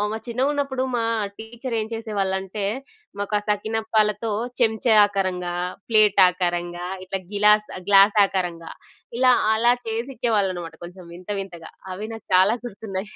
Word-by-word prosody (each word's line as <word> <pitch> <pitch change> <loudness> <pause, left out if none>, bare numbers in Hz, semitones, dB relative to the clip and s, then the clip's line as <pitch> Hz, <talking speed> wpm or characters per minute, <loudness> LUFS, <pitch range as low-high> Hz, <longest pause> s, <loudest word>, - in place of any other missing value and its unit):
ఆహ్, 210 +1 -1
చిన్నగున్నప్పుడు 265 +2 -1
మా 230 - 0 0.3
టీచరేం 230 0 -4
చేసేవాళ్ళంటే, 200 -3 -3 0.5
మాకు 205 +1 -3
ఆ - - -4
సకినప్పాలతో 220 +1 0 0.3
చెంచా 225 0 +3
ఆకారంగా, 185 -3 -2 0.3
ప్లేట్ 215 -3 +4
ఆకారంగా, 175 -1 -2 0.2
ఇట్లా 190 +1 -4
గిలాస్ 210 +1 +4 0.2
గ్లాస్ 200 +1 +6
ఆకారంగా 175 -4 -4 0.5
ఇలా 255 0 +5 0.2
అలా 235 +2 +4
చేసిచ్చేవాళ్ళన్నమాట. 220 -8 -2
కొంచెం 175 +1 -11
వింత 180 +3 -11
వింతగా. 170 -4 -9 0.2
అవి 205 +4 -6
నాకు 225 - -11
చాలా 190 +5 +5
గుర్తున్నయి. 205 -3 -6
210 Hz, 120 wpm, -23 LUFS, 185-225 Hz, 0.5 s, గ్లాస్